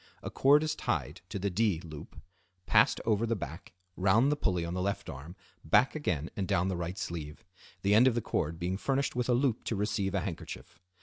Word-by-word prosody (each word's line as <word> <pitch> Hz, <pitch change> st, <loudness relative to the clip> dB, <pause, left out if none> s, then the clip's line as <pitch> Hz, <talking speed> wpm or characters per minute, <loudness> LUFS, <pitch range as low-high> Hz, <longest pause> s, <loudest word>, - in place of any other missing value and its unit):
A -, -, -5 dB
cord 145 Hz, +3 st, +5 dB
is 155 Hz, -1 st, 0 dB
tied 75 Hz, -, -2 dB
to -, -, -4 dB
the 100 Hz, +1 st, -1 dB
"D" 100 Hz, -3 st, +1 dB
loop, 80 Hz, -4 st, -10 dB, 0.5 s
passed -, -, +4 dB
over 115 Hz, +1 st, +2 dB
the 115 Hz, -, +1 dB
back, 85 Hz, -2 st, -8 dB, 0.2 s
round 110 Hz, +9 st, +3 dB
the -, -, +2 dB
pulley 90 Hz, -, 0 dB
on 85 Hz, -, -4 dB
the 90 Hz, -, -2 dB
left 100 Hz, +1 st, -2 dB
arm, 80 Hz, +7 st, -9 dB, 0.3 s
back 120 Hz, +12 st, +4 dB
again 85 Hz, -, -2 dB
and 95 Hz, -2 st, -2 dB
down 90 Hz, +3 st, +1 dB
the 95 Hz, -, -1 dB
right 85 Hz, +2 st, -4 dB
sleeve; 80 Hz, +2 st, -6 dB, 0.4 s
the 100 Hz, +1 st, +3 dB
end 115 Hz, +5 st, +7 dB
of 125 Hz, -, +3 dB
the -, -, +2 dB
cord 80 Hz, -5 st, -2 dB
being 90 Hz, +2 st, -2 dB
furnished 135 Hz, +5 st, -1 dB
with 125 Hz, 0 st, -1 dB
a -, -, +5 dB
loop 125 Hz, -3 st, +1 dB
to 115 Hz, -, -1 dB
receive 100 Hz, -1 st, -1 dB
a 95 Hz, -, +1 dB
handkerchief. 90 Hz, -4 st, -7 dB
95 Hz, 220 wpm, -30 LUFS, 85-115 Hz, 0.5 s, end